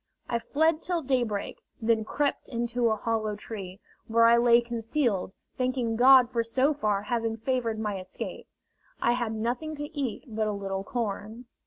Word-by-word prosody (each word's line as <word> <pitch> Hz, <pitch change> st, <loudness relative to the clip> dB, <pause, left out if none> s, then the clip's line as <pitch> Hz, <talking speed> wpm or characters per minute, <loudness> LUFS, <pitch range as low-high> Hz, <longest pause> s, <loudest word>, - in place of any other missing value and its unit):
I 235 Hz, -, 0 dB
fled 315 Hz, +6 st, +1 dB
till 345 Hz, -2 st, -2 dB
daybreak, 240 Hz, -6 st, -1 dB, 0.2 s
then 225 Hz, -1 st, +2 dB
crept 285 Hz, +5 st, -1 dB
into 240 Hz, -1 st, 0 dB
a 220 Hz, -, +2 dB
hollow 215 Hz, -1 st, -1 dB
tree, 200 Hz, -3 st, -7 dB, 0.3 s
where 230 Hz, +1 st, +4 dB
I 230 Hz, 0 st, +7 dB
lay 235 Hz, 0 st, +6 dB
concealed, 235 Hz, -3 st, -1 dB, 0.3 s
thanking 255 Hz, -3 st, 0 dB
God 255 Hz, 0 st, +7 dB
for 235 Hz, -2 st, +1 dB
so 260 Hz, +6 st, +2 dB
far 210 Hz, -8 st, 0 dB
having 225 Hz, 0 st, -1 dB
favored 230 Hz, -1 st, -1 dB
my 210 Hz, -3 st, -2 dB
escape. 185 Hz, -, -7 dB, 0.5 s
I 235 Hz, -, +2 dB
had 240 Hz, -2 st, -1 dB
nothing 245 Hz, +8 st, -2 dB
to 295 Hz, +2 st, -7 dB
eat 270 Hz, -6 st, -3 dB
but 220 Hz, -2 st, -1 dB
a 210 Hz, -, -1 dB
little 195 Hz, -1 st, -3 dB
corn. 220 Hz, +1 st, -4 dB
230 Hz, 165 wpm, -28 LUFS, 220-255 Hz, 0.5 s, I